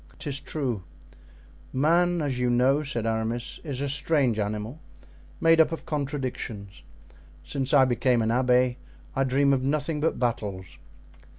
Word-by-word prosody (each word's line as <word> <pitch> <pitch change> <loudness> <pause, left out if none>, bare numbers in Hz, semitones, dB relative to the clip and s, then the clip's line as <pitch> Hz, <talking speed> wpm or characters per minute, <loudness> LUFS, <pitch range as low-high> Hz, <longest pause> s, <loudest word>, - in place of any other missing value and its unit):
"'Tis 145 -2 -4
true; 135 -7 -3 0.9
man, 170 +4 +2
as 135 -4 -2
you 125 0 +1
know," 130 +4 +3
said 120 -6 -3
Aramis, 115 +2 -2
"is 140 -5 -4
a 140 - 0
strange 140 -5 +1
animal, 105 +6 -3 0.6
made 165 0 +6
up 160 0 +2
of 165 - -5
contradictions. 130 - -4 0.6
Since 135 -1 -3
I 140 -3 +6
became 125 -1 +2
an 110 - 0
abbé 125 +1 +3 0.4
I 135 - +2
dream 140 +2 +3
of 130 - +1
nothing 150 +3 -1
but 160 +2 0
battles." 100 -7 -3
130 Hz, 140 wpm, -26 LUFS, 120-145 Hz, 0.9 s, made